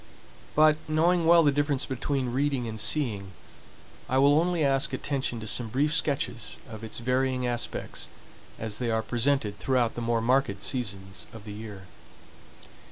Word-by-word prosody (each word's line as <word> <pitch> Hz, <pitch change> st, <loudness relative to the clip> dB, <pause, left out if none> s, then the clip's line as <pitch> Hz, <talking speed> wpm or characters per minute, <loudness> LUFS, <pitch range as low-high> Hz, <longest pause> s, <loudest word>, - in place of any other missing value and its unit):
But, 155 Hz, 0 st, +5 dB
knowing 165 Hz, +2 st, +2 dB
well 170 Hz, 0 st, +7 dB
the 145 Hz, -, +4 dB
difference 145 Hz, -1 st, 0 dB
between 130 Hz, -1 st, -2 dB
reading 135 Hz, -2 st, 0 dB
and 110 Hz, -1 st, -5 dB
seeing, 105 Hz, -4 st, +1 dB, 0.8 s
I 130 Hz, -, +2 dB
will 140 Hz, +3 st, +5 dB
only 175 Hz, -1 st, +1 dB
ask 135 Hz, 0 st, +2 dB
attention 130 Hz, -3 st, -2 dB
to -, -, -6 dB
some 115 Hz, +2 st, -1 dB
brief 145 Hz, +7 st, +1 dB
sketches 140 Hz, -7 st, 0 dB
of 110 Hz, -1 st, -9 dB
its 110 Hz, -, -5 dB
varying 125 Hz, +1 st, 0 dB
aspects 120 Hz, -1 st, -2 dB, 0.5 s
as 110 Hz, -2 st, -4 dB
they 120 Hz, -2 st, -1 dB
are 110 Hz, 0 st, 0 dB
presented 120 Hz, -4 st, 0 dB
throughout 125 Hz, -3 st, +1 dB
the 120 Hz, -, -5 dB
more 115 Hz, 0 st, +1 dB
marked 120 Hz, -4 st, +1 dB
seasons 100 Hz, -7 st, -3 dB
of 110 Hz, -2 st, -11 dB
the 105 Hz, -, -7 dB
year. 105 Hz, -2 st, -8 dB
125 Hz, 160 wpm, -27 LUFS, 110-145 Hz, 0.8 s, well